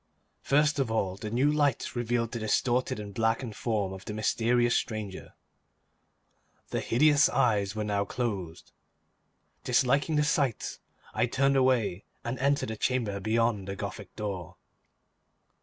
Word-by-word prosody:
First 150 +1 +2
of 135 -4 +1
all, 100 -4 0
the 105 +2 -6
new 130 +6 +2
light 145 -5 0
revealed 120 -1 -1
the 120 - -4
distorted 120 +2 0
and 100 -1 -7
blackened 115 +1 0
form 105 -5 -1
of 95 0 -10
the 105 - -5
mysterious 120 +3 +2
stranger. 110 -5 -4 1.3
The - - -1
hideous 145 +4 +4
eyes 105 -4 +1
were 110 - -2
now 100 -1 0
closed. 100 -8 -4 0.9
Disliking 135 +5 +2
the 150 - +3
sight, 145 -6 0 0.3
I - - +1
turned 135 +3 +2
away 125 -8 +2 0.2
and 120 +2 -4
entered 140 -2 +1
the 110 - -4
chamber 115 -5 0
beyond 110 -1 0
the 95 - -4
Gothic - - -7
door. 95 -5 -5
115 Hz, 140 wpm, -29 LUFS, 105-130 Hz, 1.3 s, hideous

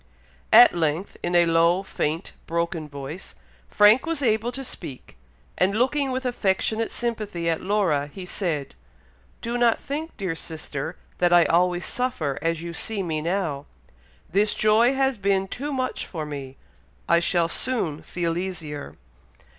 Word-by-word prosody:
At 240 +2 +9
length, 165 +2 -1
in 175 0 -1
a 175 0 +6
low, 170 +3 +3
faint, 165 -2 -2 0.2
broken 170 -2 -2
voice, 140 +5 -8 0.3
Frank 215 +8 +5
was 325 -4 -1
able 225 0 +1
to 270 +2 -5
speak, 140 - -8 0.4
and 190 +3 +2
looking 270 +3 +1
with 260 0 -3
affectionate 220 -1 0
sympathy 215 -8 -3
at 165 -1 0
Laura, 180 -8 +1
he 185 +4 -8
said, 165 -7 -2 0.7
"Do 235 +1 -2
not 235 -1 +4
think, 310 +4 -5
dear 190 -5 -2
sister, 155 -4 -5 0.2
that 175 -1 +3
I 175 -1 +7
always 175 +1 +2
suffer 175 - -2
as 165 0 -1
you 170 0 -5
see 205 +3 -3
me 160 -3 -2
now. 165 -5 -2 0.6
This 210 +3 +2
joy 225 +5 +4
has 265 -3 +1
been 195 -1 +1
too 280 +9 -5
much 255 -2 -2
for 160 -4 -5
me. 140 -3 -7 0.5
I 170 - +5
shall 170 0 +2
soon 165 - 0
feel 170 -1 -2
easier." 160 -6 -5
180 Hz, 150 wpm, -24 LUFS, 165-225 Hz, 0.7 s, At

